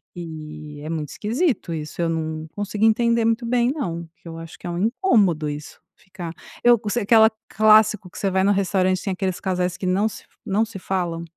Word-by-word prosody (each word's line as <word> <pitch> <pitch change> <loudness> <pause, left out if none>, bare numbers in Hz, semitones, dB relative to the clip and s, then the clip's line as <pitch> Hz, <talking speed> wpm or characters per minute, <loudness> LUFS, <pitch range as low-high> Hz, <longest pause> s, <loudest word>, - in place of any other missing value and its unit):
E 155 -3 -8
é 155 - -6
muito 155 -3 -3
esquisito 235 - -1
isso, 155 +1 -4
eu 165 - +1
não 160 -1 -3
consegui 205 +1 -1
entender 235 +1 +3
muito 230 +1 +1
bem 245 +1 +2
não, 170 - -4
que - - -17
eu 165 0 -7
acho 165 -1 -9
que - - -8
é - - -3
incômodo 200 - +2
isso, 145 +1 -7 0.2
ficar 180 -3 -8 0.3
eu 240 -1 +6
co 210 -1 -5
se 240 - 0
aquela 220 +1 +6 0.2
clássico 215 -2 +4
que - - -13
você 195 - +1
vai 190 0 +1
no 200 - +4
restaurante 185 -1 +1
tem 195 - -2
aqueles 185 -1 -2
casais 180 -1 -1
que 185 - -5
não 195 +4 +2
se - - -11 0.2
não 215 +2 +1
se 220 -3 -9
falam? 175 -3 -2
190 Hz, 205 wpm, -23 LUFS, 165-220 Hz, 0.3 s, eu